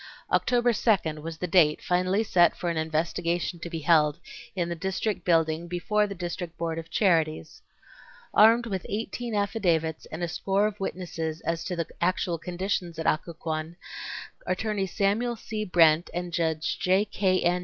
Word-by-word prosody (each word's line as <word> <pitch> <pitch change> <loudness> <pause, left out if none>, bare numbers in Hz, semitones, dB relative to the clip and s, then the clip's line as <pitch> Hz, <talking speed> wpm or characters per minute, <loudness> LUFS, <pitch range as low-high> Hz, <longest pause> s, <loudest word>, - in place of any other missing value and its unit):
October 245 -1 +3
2nd 180 -9 +1
was 165 +1 -6
the 180 - -3
date 165 -4 +4
finally 185 +4 +1
set 175 -5 +4
for 175 - -1
an - - -3
investigation 170 +2 -1
to 170 - -6
be 165 -1 -4
held 150 -2 +4 0.4
in 175 -3 0
the 170 - -2
District 190 +2 -2
Building 165 -1 +2
before 205 +4 0
the 200 - -6
District 175 -1 -5
Board 165 -1 -2
of 165 - -9
Charities. 160 - +1 0.7
Armed 230 +3 +6
with 195 -5 -3
18 230 +2 -3
affidavits 175 -7 0
and 160 +2 -6
a - - +1
score 195 +4 0
of 210 -1 -3
witnesses 165 -4 -4
as 165 0 -2
to 180 - -2
the 170 -1 -1 0.2
actual 175 -1 0
conditions 180 -1 -3
at 160 - -4
Occoquan, 160 0 -2 0.7
Attorney 210 -3 -1
Samuel 220 +5 0
C. 215 -1 -4
Brent 165 -3 +4
and 175 0 -3
Judge 160 -2 -1
J. 190 +3 +3
K. 190 -2 +1
N. 175 +1 +2
175 Hz, 165 wpm, -27 LUFS, 165-195 Hz, 0.7 s, Armed